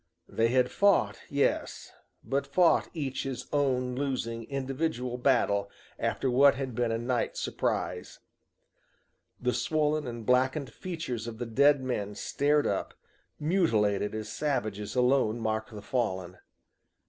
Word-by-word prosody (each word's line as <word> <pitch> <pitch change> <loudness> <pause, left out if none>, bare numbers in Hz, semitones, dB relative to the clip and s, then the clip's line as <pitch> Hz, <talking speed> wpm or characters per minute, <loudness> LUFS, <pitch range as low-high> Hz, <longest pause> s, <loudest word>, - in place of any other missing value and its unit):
They 115 - +1
had 125 +1 +2
fought, 200 -1 +3
yes, 140 0 -1 0.3
but 140 +1 -1
fought 170 +5 +3
each 140 -5 -3
his 135 -2 -4
own 130 -3 +1
losing 125 -4 -2
individual 135 -1 -2
battle 100 -6 +2 0.3
after - - -1
what 135 +3 +5
had 130 -2 -4
been 120 0 0
a 115 - 0
night 120 +1 -1
surprise. - - -2 1.2
The 125 0 0
swollen 155 -2 0
and 120 -2 -6
blackened 130 +1 +1
features 160 -11 -5
of 115 -1 -6
the 120 - -3
dead 140 +4 +4
men 105 -5 -3
stared 145 +5 +1
up, - - -2 0.4
mutilated 110 - +1
as 110 -1 -5
savages 105 -5 -2
alone 125 -3 +3
mark 110 -1 -2
the 105 -2 -9
fallen. 95 -7 -2
125 Hz, 130 wpm, -29 LUFS, 115-140 Hz, 1.2 s, what